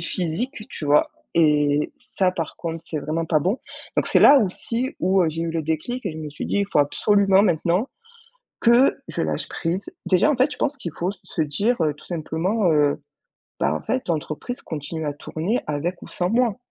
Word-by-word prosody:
physique, 180 - -2 0.2
tu 155 - -6
vois? 145 +1 +4 0.3
Et 150 -2 +3
ça 200 -7 0
par 165 -4 -4
contre 165 -1 -5
c'est 155 - -3
vraiment 160 +3 -2
pas 155 -1 +2
bon. 190 - 0 0.4
Donc - - +2
c'est - - +4
là 285 0 +9
aussi 230 +4 -2
où, 190 +1 +3
heu, - - +2
j'ai 165 +2 -3
eu 165 - -2
le 165 -1 -2
déclic 160 +11 -3
et 180 - -2
je 155 - -8
me 155 -2 -6
suis - - -6
dit: - - -1
«Il 200 - 0
faut - - +2
absolument 195 +6 +4
maintenant 180 - +1 0.7
que 240 +3 +5
je - - -2
lâche - - -2
prise». 175 +4 -3 0.2
Déjà 185 +10 +4
en 280 - +1
fait 265 +4 +2
je - - -7
pense 295 0 0
qu'il 170 - -6
faut 180 +3 -1
s 205 - -10
se 160 - -2
dire, 200 +12 0
heu, 150 -2 +1
tout 145 - -17
simplement, 175 +4 0
heu: 145 -1 +2 0.6
«Bah 70 +3 +2
en - - -4
fait 255 -7 -2
l'entreprise 160 - -3
continue 160 +1 -5
à 145 - -1
tourner 165 - -2
avec 155 +5 -2
ou - - -9
sans 180 +1 -1
moi». 235 -2 +2
170 Hz, 210 wpm, -23 LUFS, 155-210 Hz, 0.7 s, là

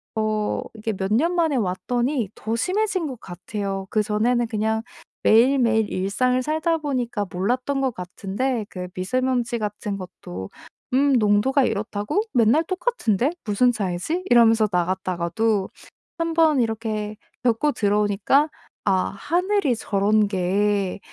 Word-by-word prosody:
어 215 -1 0
이게 220 0 -3
몇 190 +1 -2
년 330 +10 +2
만에 325 -5 +2
왔더니 240 +4 -1
더 225 +1 -3
심해진 375 - 0
것 255 -5 -7
같아요. 195 +2 -5
그전에는 225 +3 +1
그냥 220 0 -1 0.4
매일매일 230 -2 +4
일상을 250 +7 +1
살다 315 +3 0
보니까 250 -8 -2
몰랐던 250 +9 -1
것 265 -2 0
같은데 205 +6 -3
그 180 -1 -6
미세먼지 245 +4 0
같은 210 -1 -3
것도 95 - -8 0.4
"음 280 +2 +4
농도가 230 +4 +3
이렇다고? 210 - -1
맨날 240 +5 +4
똑같은데 325 - 0
무슨 225 +4 +3
차이지?" 210 - -2
이러면서 225 -2 +6
나갔다가도 185 +3 0 0.5
1 330 0 -1
번 315 -5 +4
이렇게 220 -2 -2 0.3
겪고 250 +5 +2
들어오니까 210 +7 +2 0.4
'아 195 - +3 0.2
하늘이 350 - +1
저런 210 0 +2
게 200 +1 0
220 Hz, 280 characters per minute, -23 LUFS, 200-260 Hz, 0.5 s, 이러면서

